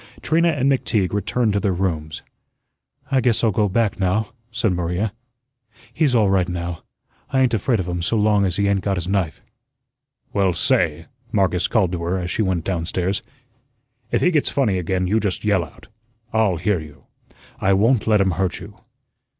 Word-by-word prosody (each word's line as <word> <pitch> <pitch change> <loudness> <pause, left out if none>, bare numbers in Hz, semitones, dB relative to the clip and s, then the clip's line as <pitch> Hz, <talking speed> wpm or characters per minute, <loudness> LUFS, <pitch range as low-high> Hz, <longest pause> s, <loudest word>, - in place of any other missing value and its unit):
Trina 165 +2 +2
and 145 -5 +1
McTeague 105 -8 0
returned 110 +2 0
to 100 - +1
their 100 -1 0
rooms. 80 -5 -3 0.9
"I 135 -1 +3
guess 120 -2 +1
I'll 115 - +4
go 105 +1 +1
back 105 0 0
now," 100 +3 0 0.2
said 115 -4 0
Maria. 90 +4 -2 0.8
"He's 145 -6 +2
all 110 -3 +4
right 95 -2 +2
now. 85 -1 -4 0.5
I 130 - +2
ain't 125 -2 +2
afraid 115 +1 +1
of 90 - -3
him 90 -1 -3
so 110 +7 0
long 105 -1 +3
as 90 -3 0
he 100 +1 +1
ain't 100 -1 +1
got 100 -1 -1
his 90 -1 -3
knife." 95 -5 -1 0.9
"Well, 95 -3 +2
say," 85 - +1 0.3
Marcus 95 -4 +1
called 100 -7 +1
to 90 -2 -3
her 85 +3 -1
as 90 0 -3
she - - 0
went 95 -5 0
down 85 -3 -2
stairs, 95 +2 -1 0.9
"if - - 0
he 180 - +4
gets 150 -4 +2
funny 110 -10 +1
again, 90 +1 -1
you 105 +5 +2
just 100 -1 -2
yell 100 -4 +2
out; - - -14 0.5
I'LL 110 -5 +2
hear 95 +3 0
you. 75 -2 -12 0.6
I 95 - +2
won't 110 +5 +2
let 105 -2 +4
him 95 -1 +2
hurt 90 +1 -1
you." - - -11
100 Hz, 190 wpm, -21 LUFS, 90-110 Hz, 0.9 s, I'll